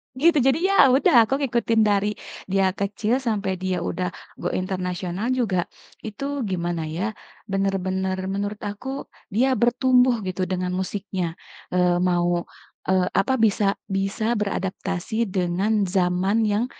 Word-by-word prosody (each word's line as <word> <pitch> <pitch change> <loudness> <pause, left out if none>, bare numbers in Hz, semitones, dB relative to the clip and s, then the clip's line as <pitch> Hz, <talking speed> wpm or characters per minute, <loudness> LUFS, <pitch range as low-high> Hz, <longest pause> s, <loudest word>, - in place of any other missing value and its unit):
Gitu 315 +4 +4
jadi 270 +3 +3
ya 395 - +2
udah 250 -3 +5
aku 270 - +1
ngikutin 235 -3 +2
dari 205 0 +2 0.4
dia 195 0 +2
kecil 210 +5 -1
sampai 205 -7 -2
dia 185 -2 -2
udah 180 +1 -2 0.3
go - - -2
international 185 +1 -3
juga 195 -9 0 0.4
itu 275 +5 -3
gimana 170 -3 -2
ya, 180 +8 -2 0.4
bener-bener 190 -1 0 0.2
menurut 205 +1 -3
aku 255 +7 -5 0.2
dia 250 +7 +2
bertumbuh 250 -1 +3
gitu 185 0 -2
dengan 180 -1 -1
musiknya, 185 -2 -3 0.4
eee, 180 -1 +3
mau, 175 -1 +1 0.5
eee, 185 -1 +3
apa 235 +7 +2
bisa 205 -3 +2
bisa 195 +3 -1
beradaptasi 195 +2 -2
dengan 190 +4 +1
zaman 185 +2 +1
yang, 210 +3 +1
195 Hz, 130 wpm, -23 LUFS, 185-225 Hz, 0.5 s, udah